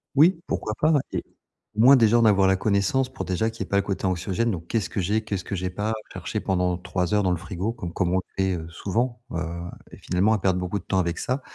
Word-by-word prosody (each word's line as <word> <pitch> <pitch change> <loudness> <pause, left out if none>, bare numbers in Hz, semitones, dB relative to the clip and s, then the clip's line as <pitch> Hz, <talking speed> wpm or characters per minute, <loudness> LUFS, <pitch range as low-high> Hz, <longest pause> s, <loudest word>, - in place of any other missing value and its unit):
Oui, 165 +4 +5
pourquoi 110 - -2
pas 155 - +4 0.2
et - - -2 0.5
au 105 - -8
moins, 130 +5 +8
déjà, 120 -2 +5
en 115 - +4
avoir 100 -3 +5
la 95 - +3
connaissance 100 +6 +1
pour 130 +1 -6
déjà 105 +5 0
qu'il 115 -2 -9
y - - -1
ait - - -20
pas 100 - +2
le 100 - +4
côté 95 -1 -3
anxiogène, 95 +5 0
donc 85 -3 -5
qu'est-ce 110 -5 -1
que - - -3
j'ai, 105 +5 0
qu'est-ce 100 -4 -4
que 100 - -3
j'ai 90 0 -2
pas, 105 +4 -2 0.2
chercher - - -4
pendant 90 -2 0
3 90 +1 -2
heures 105 -1 +3
dans 95 - +2
le 90 - +1
frigo 95 +3 -3
comme 90 -7 -7
comme 90 -2 0
on 95 - +3 0.2
le 95 - +2
fait 95 -2 0
souvent, 115 +8 -2
heu - - -3 0.5
et - - -10
finalement 95 +5 +1
à 110 - +2
perdre 95 -1 +1
beaucoup 90 +3 -2
de - - -14
temps 95 -1 0
avec 85 -1 -1
ça 130 +2 -2
100 Hz, 265 wpm, -25 LUFS, 90-110 Hz, 0.5 s, moins